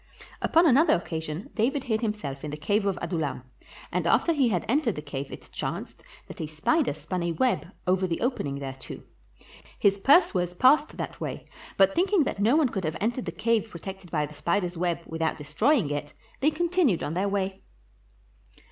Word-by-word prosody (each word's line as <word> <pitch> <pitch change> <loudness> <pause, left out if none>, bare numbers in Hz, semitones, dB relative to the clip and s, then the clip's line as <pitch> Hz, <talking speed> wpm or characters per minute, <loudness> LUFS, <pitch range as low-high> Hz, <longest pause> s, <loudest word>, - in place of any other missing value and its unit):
Upon 330 +2 +4
another 300 +3 +5
occasion 160 0 -5
David 265 +5 0
hid 220 -3 -1
himself 210 - -3
in 150 - -4
the 150 - -5
cave 200 +7 0
of 195 - 0
Adullam, 160 -7 -2 0.5
and - - 0
after 335 - +3
he 275 -6 +3
had 180 -6 -1
entered 250 -3 +1
the 150 - -5
cave 140 -1 -5
it - - -10
chanced - - -5 0.3
that - - -8
a 155 - -3
spider 155 - +1
spun 165 +4 -4
a 170 0 -1
web 165 - +1 0.2
over 185 0 +2
the 165 - -2
opening 185 - -1
thereto. 135 -1 -7 0.7
His 200 0 +3
pursuers 190 - +4
passed 285 - +4
that - - -6
way, - - -4 0.3
but 195 0 +5
thinking 375 -1 +3
that 230 - -3
no 220 +7 +4
one 305 -5 +4
could 195 -4 -3
have 155 0 -2
entered 240 +4 -1
the 170 - -3
cave 220 +4 0
protected 190 +1 -8
by 150 -3 0
the 150 - -11
spider's 175 +3 -1
web 170 0 -1
without 160 0 -2
destroying 155 - +1
it, 145 0 -4 0.2
they 290 - +4
continued 335 - +1
on 150 - -2
their 190 +4 0
way. 195 -1 -2
190 Hz, 185 wpm, -27 LUFS, 160-250 Hz, 0.7 s, another